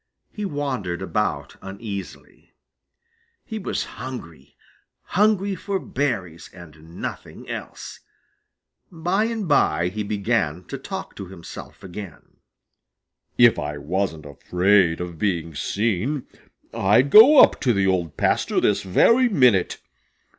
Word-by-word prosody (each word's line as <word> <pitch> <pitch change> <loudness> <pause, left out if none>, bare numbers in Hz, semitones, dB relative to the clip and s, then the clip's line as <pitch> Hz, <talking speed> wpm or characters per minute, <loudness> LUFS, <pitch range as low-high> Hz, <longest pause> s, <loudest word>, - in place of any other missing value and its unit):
He 210 - -5
wandered 130 - -3
about - - -2
uneasily. 100 0 -9 0.9
He 220 -1 -5
was 190 - -2
hungry 85 - -9 0.5
hungry 200 0 +1
for 195 +2 -3
berries 105 - -3
and 80 -1 -14
nothing - - -7
else. - - -7 0.9
By 180 +5 0
and 225 -4 -3
by 90 - +2
he 105 +4 -5
began 100 -5 -1
talking 140 - -7
to 100 - -7
himself 90 +2 -11
again. 95 -2 -10 1.0
"If - - +6
I 75 - -4
wasn't 80 +1 -3
afraid 90 +4 +2
of 85 -3 -7
being 85 -5 -1
seen, 110 - -1 0.5
I'd 110 +8 +3
go 245 - +9
up - - +6
to 130 - +2
the 100 -3 +1
Old 90 -5 -1
Pasture - - +1
this 105 - +1
very 230 - +4
minute. 125 - +3
100 Hz, 115 wpm, -23 LUFS, 85-145 Hz, 1.0 s, go